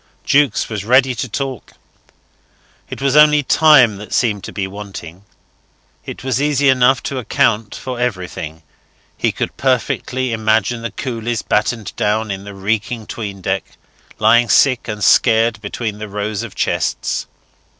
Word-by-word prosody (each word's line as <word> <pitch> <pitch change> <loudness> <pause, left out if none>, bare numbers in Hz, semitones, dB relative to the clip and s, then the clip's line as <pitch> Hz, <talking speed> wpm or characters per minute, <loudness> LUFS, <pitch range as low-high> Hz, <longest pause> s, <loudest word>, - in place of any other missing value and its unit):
Jukes 140 -5 +2
was 105 -4 -4
ready 130 +3 +3
to 125 +1 -4
talk: 130 +1 -5 1.2
it - - -7
was 140 0 +2
only 150 -1 +6
time 135 -8 +5
that 105 +1 -6
seemed 105 -5 0
to - - -7
be 100 - -3
wanting. 95 -2 -9 0.8
It - - -7
was 130 0 -1
easy 145 -1 +2
enough 130 0 +3
to 135 - -3
account 115 -4 0
for 130 -2 -6
everything. 90 -8 -4 0.5
He - - 0
could - - -4
perfectly 130 -1 -1
imagine 110 +1 +1
the 115 - -3
coolies 120 -3 -4
battened 105 0 -1
down 105 0 0
in 95 0 -6
the 100 -1 -9
reeking 110 +3 -2
'tween 100 -4 -6
deck, - - -3 0.4
lying 120 0 +4
sick 130 -4 +3
and 105 -2 -4
scared 115 0 +3
between 105 0 -4
the 105 -1 -6
rows 105 +1 -3
of 115 -4 -8
chests. - - -1
115 Hz, 150 wpm, -18 LUFS, 105-130 Hz, 1.2 s, only